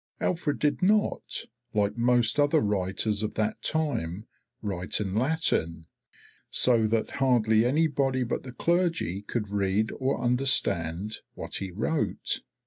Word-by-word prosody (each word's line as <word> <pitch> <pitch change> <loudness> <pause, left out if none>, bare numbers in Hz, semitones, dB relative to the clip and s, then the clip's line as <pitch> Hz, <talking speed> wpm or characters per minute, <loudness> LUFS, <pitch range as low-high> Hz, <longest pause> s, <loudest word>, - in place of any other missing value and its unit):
Alfred 165 -5 0
did 150 +4 0
not, 210 +3 +1 0.3
like 100 -1 +1
most 120 +1 +2
other 145 +2 +4
writers 100 0 0
of 110 0 -3
that 105 -1 -1
time, 110 - -2 0.4
write 95 -3 -2
in 100 -3 -2
Latin, 110 - 0 0.6
so 115 -3 +3
that 110 0 0
hardly 115 -4 +4
anybody 140 -3 +1
but 120 - -2
the 130 - -9
clergy 165 - 0
could 105 0 -3
read 100 +2 +1
or 130 +1 0
understand 110 -7 +1 0.2
what - - -5
he 95 - -4
wrote. 110 - -1
115 Hz, 130 wpm, -27 LUFS, 100-140 Hz, 0.6 s, other